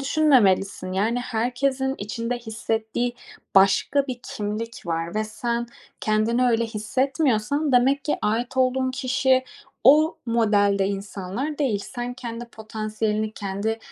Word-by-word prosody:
düşünmemelisin. 210 -11 +3
Yani 225 +6 +1
herkesin 255 +3 -1
içinde 230 +4 -3
hissettiği 225 +1 -2 0.4
başka 195 +9 +4
bir 250 -2 -5
kimlik 215 0 -5
var 165 +2 -2
ve 215 0 0
sen 235 +2 -2 0.3
kendini 220 +3 +2
öyle 230 -1 +3
hissetmiyorsan, 260 +4 0
demek 265 +3 +3
ki 300 - 0
ait 235 +4 -1
olduğun 260 0 +2
kişi 260 0 +2 0.4
o 305 +5 +6
modelde 205 -4 +3
insanlar 200 +8 -4
değil. 220 -9 0
Sen 245 0 -4
kendi 235 -1 -6
potansiyelini, 215 -1 -3
kendi 205 +3 -3
230 Hz, 115 wpm, -24 LUFS, 215-260 Hz, 0.4 s, o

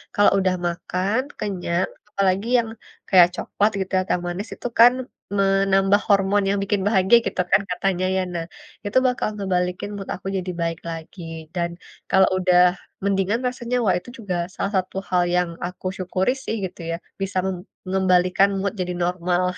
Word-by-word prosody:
kalau 205 - +5
udah 185 -1 +1
makan, 185 +6 -1 0.2
kenyang, 185 -3 -1 0.2
apalagi 195 +2 +1
yang 225 - -2 0.4
kayak 180 -3 +7
coklat 210 +2 0
gitu 190 -1 -3
ya, - - +3
atau - - +1
manis 185 +5 -4
itu - - -5
kan 240 +2 +9 0.4
menambah 195 0 +3
hormon 200 -1 +3
yang 200 - +1
bikin 200 0 0
bahagia 195 +2 +5
gitu - - -1
kan 195 +1 +5
katanya 185 0 0
ya. 190 - +2
Nah, 165 -1 -3 0.4
itu 205 +4 0
bakal 250 - 0
ngebalikin 180 -1 -1
mood 195 -1 -7
aku 190 - -9
jadi 185 -1 -3
baik 165 0 -1
lagi. 165 +2 -8 0.3
Dan, 170 -1 0 0.4
kalau 190 0 +6
udah 180 -1 +4 0.4
mendingan 200 +3 +1
rasanya, 250 0 -3
wah 185 -4 +3
itu 245 - -14
juga 200 -5 -3 0.2
salah 195 - -2
satu 185 - -11
hal 180 -1 +3
yang 180 -1 +2 0.2
aku 180 +1 -8
syukuri 185 +3 0
sih 225 - -2
gitu 180 - -9
ya, 165 - -1 0.3
bisa 195 0 -2
mem 190 - -1 0.3
ngembalikan 185 0 +3
mood 200 +2 -1
jadi 180 0 -1
normal. 180 0 0
190 Hz, 170 wpm, -23 LUFS, 180-200 Hz, 0.4 s, kan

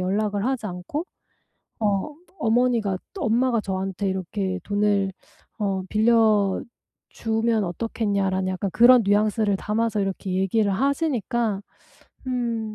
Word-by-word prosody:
연락을 205 +2 0
하지 255 -4 -1
않고 180 - -4 0.8
어 210 +7 0 0.2
어머니가 225 -4 +2 0.2
엄마가 240 - +2
저한테 190 0 -3
이렇게 190 0 -2
"돈을 205 -1 +1 0.5
어 195 -2 -1
빌려주면 220 +1 +1
어떻겠냐."라는 195 -1 -1
약간 185 +1 -2
그런 245 +1 +7
뉘앙스를 205 0 +2
담아서 215 +1 -1
이렇게 195 -1 -3
얘기를 195 +2 +1
하시니까 240 - 0 0.7
음 230 -4 -2
210 Hz, 265 characters per minute, -24 LUFS, 195-230 Hz, 0.8 s, 그런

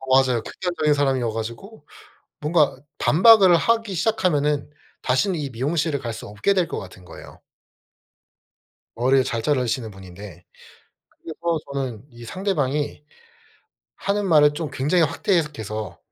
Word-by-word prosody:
어 130 0 +2
맞아요. 120 -3 0
극단적인 160 -2 -1
사람이어 135 -5 +1
가지고 115 - -7 0.5
뭔가 150 -1 +2 0.2
반박을 190 0 +6
하기 225 +2 +1
시작하면은 155 -8 0 0.3
다신 170 +9 +1
이 145 -3 -3
미용실을 145 +4 -1
갈 120 -2 -5
수 - - -8
없게 105 - 0
될 180 -3 +2
것 - - -4
같은 90 -1 -12
거예요. - - -13 1.6
머릴 130 +2 +3
잘 115 -1 -3
자르시는 125 -5 -1
분인데. 95 -1 -12 0.8
그리고 165 0 -2
저는 130 -5 -4
이 120 -1 -12
상대방이 150 - -2 0.9
하는 200 0 -1
말을 150 -4 +5
좀 155 -2 -4
굉장히 160 +6 +2
확대 180 +5 0
해석해서 110 - -4
145 Hz, 295 characters per minute, -22 LUFS, 120-170 Hz, 1.6 s, 반박을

